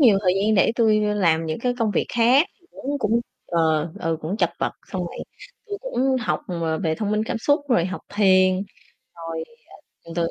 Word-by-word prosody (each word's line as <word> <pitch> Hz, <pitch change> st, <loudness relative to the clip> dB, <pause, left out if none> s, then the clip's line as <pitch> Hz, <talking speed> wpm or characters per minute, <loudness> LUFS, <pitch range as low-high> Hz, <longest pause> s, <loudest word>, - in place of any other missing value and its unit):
nhiều 225 Hz, -8 st, +6 dB
thời 180 Hz, -2 st, +3 dB
gian 210 Hz, +3 st, +2 dB
để 200 Hz, +3 st, +4 dB
tui, 215 Hz, -2 st, +3 dB
ơ, 210 Hz, 0 st, 0 dB
làm 165 Hz, -5 st, +2 dB
những 155 Hz, -, -3 dB
cái 245 Hz, +1 st, 0 dB
công 225 Hz, -3 st, +1 dB
việc -, -, 0 dB
khác, 245 Hz, +7 st, +4 dB, 0.2 s
cũng 285 Hz, +2 st, -4 dB
cũng 230 Hz, -1 st, +1 dB, 0.3 s
ờ, 160 Hz, -1 st, +1 dB
ừ, 165 Hz, -2 st, 0 dB
cũng 165 Hz, +6 st, -3 dB
chật -, -, +1 dB
vật, -, -, -1 dB, 0.2 s
xong -, -, -2 dB
rồi -, -, -9 dB, 0.5 s
tui 405 Hz, -1 st, -5 dB
cũng 270 Hz, -, 0 dB
học, -, -, -1 dB
ờ, 165 Hz, -3 st, -1 dB
về 160 Hz, -4 st, 0 dB
thông 205 Hz, +3 st, -2 dB
minh 215 Hz, 0 st, +1 dB
cảm 225 Hz, -, -3 dB
xúc 285 Hz, +7 st, +2 dB
rồi 235 Hz, -10 st, +3 dB
học 185 Hz, +1 st, -4 dB
thiền, 185 Hz, -2 st, +5 dB, 0.6 s
rồi, 165 Hz, -1 st, -5 dB, 0.6 s
ờ, 165 Hz, -, -10 dB
từ 170 Hz, -, +2 dB
từ 165 Hz, -, +1 dB
205 Hz, 215 wpm, -23 LUFS, 165-235 Hz, 0.6 s, nhiều